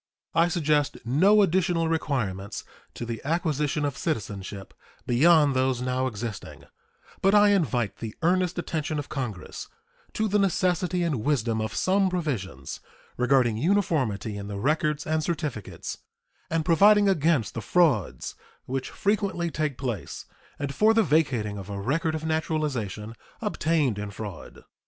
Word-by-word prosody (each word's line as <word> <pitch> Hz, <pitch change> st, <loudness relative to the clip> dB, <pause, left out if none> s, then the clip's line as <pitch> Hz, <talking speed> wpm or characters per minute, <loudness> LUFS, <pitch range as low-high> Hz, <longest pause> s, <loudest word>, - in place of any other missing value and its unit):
I 165 Hz, +1 st, +4 dB
suggest 150 Hz, -5 st, +1 dB
no 190 Hz, -, +5 dB
additional 175 Hz, -2 st, +1 dB
requirements 110 Hz, -11 st, -2 dB, 0.3 s
to 120 Hz, -, -5 dB
the 115 Hz, -1 st, -5 dB
acquisition 150 Hz, -2 st, 0 dB
of 140 Hz, -2 st, -2 dB
citizenship 100 Hz, -, -4 dB, 0.3 s
beyond 145 Hz, +3 st, +5 dB
those 130 Hz, -1 st, +1 dB
now 130 Hz, +1 st, 0 dB
existing, 110 Hz, -2 st, -6 dB, 0.6 s
but 195 Hz, +2 st, +4 dB
I 205 Hz, 0 st, +7 dB
invite 125 Hz, -, +1 dB
the 110 Hz, -2 st, -6 dB
earnest 180 Hz, +1 st, +2 dB
attention 155 Hz, -3 st, -2 dB
of 145 Hz, -, -4 dB
Congress 120 Hz, -10 st, -5 dB, 0.5 s
to 220 Hz, -, 0 dB
the 210 Hz, 0 st, +2 dB
necessity 180 Hz, -2 st, +1 dB
and 145 Hz, -10 st, -1 dB
wisdom 120 Hz, -6 st, +1 dB
of 110 Hz, 0 st, -3 dB
some 190 Hz, -, +2 dB
provisions 120 Hz, -, -3 dB, 0.4 s
regarding 125 Hz, -3 st, +3 dB
uniformity 135 Hz, -, 0 dB
in 100 Hz, 0 st, -6 dB
the 100 Hz, -1 st, -5 dB
records 150 Hz, +5 st, 0 dB
and 155 Hz, 0 st, 0 dB
certificates, 150 Hz, -, -4 dB, 0.5 s
and 160 Hz, -1 st, 0 dB
providing 205 Hz, +5 st, +6 dB
against 160 Hz, -, +2 dB
the 115 Hz, -, -4 dB
frauds 145 Hz, -, +1 dB, 0.3 s
which 130 Hz, 0 st, -3 dB
frequently 200 Hz, -5 st, -1 dB
take 150 Hz, -4 st, -2 dB
place 120 Hz, -9 st, -4 dB, 0.3 s
and 140 Hz, -1 st, -3 dB
for 215 Hz, +9 st, +4 dB
the 225 Hz, -, +5 dB
vacating 130 Hz, -, +1 dB
of 95 Hz, +1 st, -9 dB
a 100 Hz, -1 st, -4 dB
record 155 Hz, +9 st, 0 dB
of 160 Hz, 0 st, -4 dB
naturalization 145 Hz, -, -2 dB, 0.3 s
obtained 155 Hz, -, 0 dB
in 105 Hz, 0 st, -4 dB
fraud. 100 Hz, -5 st, -8 dB
150 Hz, 140 wpm, -26 LUFS, 115-170 Hz, 0.6 s, I